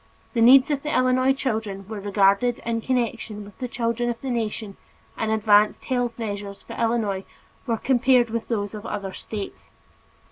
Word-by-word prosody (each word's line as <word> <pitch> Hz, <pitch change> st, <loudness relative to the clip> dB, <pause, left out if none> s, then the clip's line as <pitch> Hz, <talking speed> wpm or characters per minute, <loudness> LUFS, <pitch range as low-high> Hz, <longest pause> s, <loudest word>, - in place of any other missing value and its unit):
The 235 Hz, -, +1 dB
needs 260 Hz, +4 st, +7 dB
of 285 Hz, -1 st, 0 dB
the 300 Hz, -, -4 dB
Illinois 255 Hz, +1 st, +3 dB
children 220 Hz, -7 st, -3 dB
were 215 Hz, -1 st, -5 dB
regarded 200 Hz, +4 st, +2 dB
in 230 Hz, -1 st, -1 dB
connection 230 Hz, -4 st, -2 dB
with 200 Hz, -1 st, -15 dB
the 250 Hz, -, -3 dB
children 240 Hz, 0 st, -1 dB
of 235 Hz, -, -3 dB
the 265 Hz, -, -3 dB
nation 220 Hz, -3 st, -3 dB, 0.4 s
and 220 Hz, -, -2 dB
advanced 210 Hz, -1 st, +3 dB
health 245 Hz, -3 st, -1 dB
measures 205 Hz, -3 st, -5 dB
for -, -, -9 dB
Illinois 225 Hz, -4 st, 0 dB, 0.4 s
were 230 Hz, -1 st, +1 dB
compared 245 Hz, -1 st, +3 dB
with 230 Hz, 0 st, -3 dB
those 205 Hz, -3 st, -2 dB
of 210 Hz, 0 st, -7 dB
other 200 Hz, -2 st, -4 dB
states. 205 Hz, -3 st, -7 dB
230 Hz, 170 wpm, -24 LUFS, 205-245 Hz, 0.4 s, needs